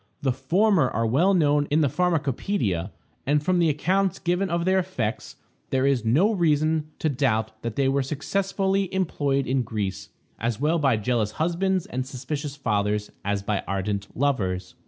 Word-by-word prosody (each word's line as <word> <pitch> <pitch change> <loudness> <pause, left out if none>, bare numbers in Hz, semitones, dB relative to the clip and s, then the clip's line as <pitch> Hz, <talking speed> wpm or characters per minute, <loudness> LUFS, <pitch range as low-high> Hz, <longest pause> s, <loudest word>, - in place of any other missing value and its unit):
The 135 - +2
former 160 - +2
are 115 +1 -1
well 165 - +3
known 145 -3 +3
in 155 +2 +3
the 150 - +3
pharmacopoeia, 140 - 0 0.4
and 145 +1 +2
from 180 +2 +2
the 170 -2 +4
accounts 185 +5 +1
given 180 +3 0
of 170 0 0
their 190 0 +3
effects, 130 - -3 0.3
there 130 0 +1
is 135 -4 +2
no 150 - +3
reason 155 -3 +1
to - - -1
doubt 110 -6 0
that 115 -2 -4
they 135 -1 +2
were 135 +1 +2
successfully 195 +7 -1
employed 145 -7 0
in 130 +1 +1
Greece, 105 -5 -4 0.3
as 115 -1 -2
well 155 +4 +2
by 135 -6 +3
jealous 110 -1 0
husbands 180 +3 0
and 130 +1 -3
suspicious 140 +3 -5
fathers 105 -5 -1
as 100 0 -1
by 100 -1 -1
ardent 100 +1 -2
lovers. 105 -10 -1
140 Hz, 165 wpm, -25 LUFS, 115-170 Hz, 0.4 s, the